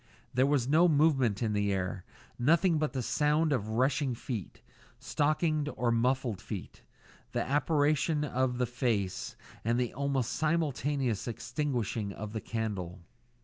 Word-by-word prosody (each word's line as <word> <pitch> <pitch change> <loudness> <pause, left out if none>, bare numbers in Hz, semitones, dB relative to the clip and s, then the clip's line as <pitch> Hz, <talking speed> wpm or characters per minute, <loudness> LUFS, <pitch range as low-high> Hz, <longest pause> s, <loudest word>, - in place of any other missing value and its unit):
There 130 +2 +3
was 140 -4 +2
no 160 +5 +5
movement 140 - +3
of 110 -2 0
the 100 -1 +1
air; 95 -1 -2 0.4
nothing 165 +5 +3
but 155 0 -1
the 130 -2 -2
sound 150 +4 +2
of 110 -5 -1
rushing 130 +3 +1
feet 115 -4 -6 0.4
stockinged 155 0 0
or 120 +1 +1
muffled 120 -2 +1
feet; - - -7 0.5
the - - +1
apparition 150 +1 +2
of 130 -2 0
the 125 - +1
face; 115 -6 -1 0.3
and 115 +2 +1
the 125 -2 -1
almost 140 -3 -1
simultaneous 145 -7 0
extinguishing 120 -4 -2
of 105 +1 -7
the 110 - -3
candle. 100 -6 -4
130 Hz, 140 wpm, -30 LUFS, 115-150 Hz, 0.5 s, no